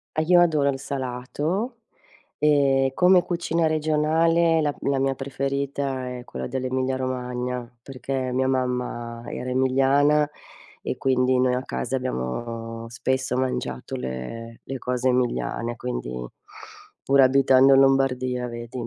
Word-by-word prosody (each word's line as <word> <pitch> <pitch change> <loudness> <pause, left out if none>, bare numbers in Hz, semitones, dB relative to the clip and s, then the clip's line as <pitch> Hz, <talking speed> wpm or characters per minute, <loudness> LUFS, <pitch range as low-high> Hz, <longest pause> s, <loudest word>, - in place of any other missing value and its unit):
Ah, 155 - +2
io 175 +1 +5
adoro 155 -5 +3
il 135 - -1
salato 140 - -3 0.6
e 140 -3 +3
come 180 0 +5
cucina 170 -2 -1
regionale 160 +2 +2
la 145 -1 0
la 140 -1 0
mia 135 0 +1
preferita 135 0 -3
è 120 - -10
quella - - -5
dell'Emilia 130 0 -1
Romagna, 125 -1 -3 0.2
perché 130 -1 -4
mia 130 0 +1
mamma 125 -2 -2
era 125 - -5
emiliana 135 +3 +3 0.5
e - - -4
quindi 130 -1 +2
noi 125 -1 +2
a 125 - -2
casa 135 - -3
abbiamo 115 - -4
spesso 130 +1 -1
mangiato 130 - -3
le 65 - -6
le 135 0 -5
cose 125 0 -1
emiliane. 120 -1 -1
Quindi 60 - -4 0.9
pure 140 0 +4
abitando 135 0 +5
in 135 - +7
Lombardia, 130 -2 +2
vedi, 120 +1 -6
130 Hz, 125 wpm, -24 LUFS, 125-140 Hz, 0.9 s, in